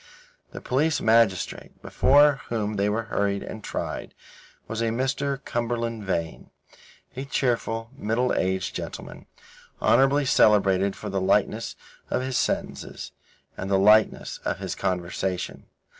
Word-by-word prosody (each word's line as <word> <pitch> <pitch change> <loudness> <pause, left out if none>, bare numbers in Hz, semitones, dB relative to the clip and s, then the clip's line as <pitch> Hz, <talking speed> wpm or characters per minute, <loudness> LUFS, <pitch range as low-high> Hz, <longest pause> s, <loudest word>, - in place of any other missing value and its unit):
The - - -9
police 145 +4 +1
magistrate, 110 -4 +1
before 145 0 +4
whom 110 -2 -1
they 100 +1 +2
were 110 +2 -1
hurried 100 -1 0
and 110 - -8
tried, - - -5 0.5
was 115 0 -3
a - - +1
Mr. 135 +4 -1
Cumberland 115 -1 -2
Vane, 85 -4 -3 0.7
a 130 - -4
cheerful, 115 -4 -1
middle 125 0 0
aged 95 0 -1
gentleman, - - -7 0.5
honourably 135 +2 +4
celebrated 100 -5 +4
for 105 - -6
the 95 -1 -1
lightness 95 - +1 0.3
of 125 - 0
his 130 0 -3
sentences - - -3 0.4
and 95 - -5
the 100 - +3
lightness 105 +2 +3
of - - -1
his - - -4
conversation. 90 0 -3
110 Hz, 130 wpm, -25 LUFS, 100-130 Hz, 0.7 s, before